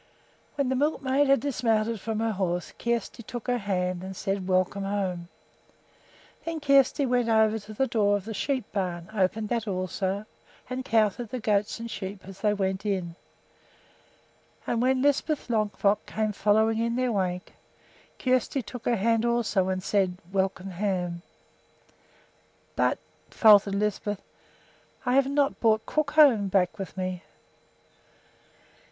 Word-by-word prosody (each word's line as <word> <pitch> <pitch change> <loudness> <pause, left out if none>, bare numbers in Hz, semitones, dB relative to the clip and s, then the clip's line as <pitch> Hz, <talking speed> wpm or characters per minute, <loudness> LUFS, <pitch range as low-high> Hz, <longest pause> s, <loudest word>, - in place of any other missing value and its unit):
When 280 -3 0
the 260 - +1
milkmaid 280 0 +1
had 275 0 +4
dismounted 230 -5 0
from 220 0 -2
her 225 0 +1
horse 180 -4 -2
Kjersti 235 0 -2
took 235 +1 -7
her 245 -1 0
hand 180 -3 -1
and 190 0 -7
said, 195 -1 -2
"Welcome 185 +1 +1
home!" 190 -3 -2 1.2
Then 330 -1 -3
Kjersti 275 -1 +4
went 245 -2 +1
over 220 0 +3
to 210 +1 -11
the 265 - +2
door 205 -4 +2
of 200 - -9
the 220 - -5
sheep 260 +2 -1
barn, 180 -2 -3
opened 210 +2 0
that 230 -2 -1
also, 190 +1 -2 0.4
and 255 +1 -4
counted 220 0 +1
the 255 - -4
goats 210 0 0
and 230 0 -6
sheep 190 0 -6
as 195 0 -11
they 210 - +3
went 190 -2 -1
in; 185 -5 -2 1.5
and 235 - 0
when 260 +1 +2
Lisbeth 285 +1 +1
Longfrock 210 -2 +1
came 215 -1 -1
following 220 +2 +2
in 230 0 0
their 255 -1 +1
wake, 180 -3 -2 0.6
Kjersti 255 +1 0
took 245 +3 -9
her 240 - +2
hand 225 +2 +2
also 235 -5 +1
and 185 0 -2
said, 190 -3 +1
"Welcome 190 0 -1
home!" 180 -2 -2 1.5
"But," - - +2 0.3
faltered 205 -3 +6
Lisbeth, 205 0 -2 0.8
"I 250 - +1
have 270 0 +4
not 280 0 +1
brought 220 -1 +2
Crookhorn 290 -8 +4
back 185 0 +1
with 195 0 -6
me." 185 -1 -3
215 Hz, 145 wpm, -27 LUFS, 190-240 Hz, 1.5 s, faltered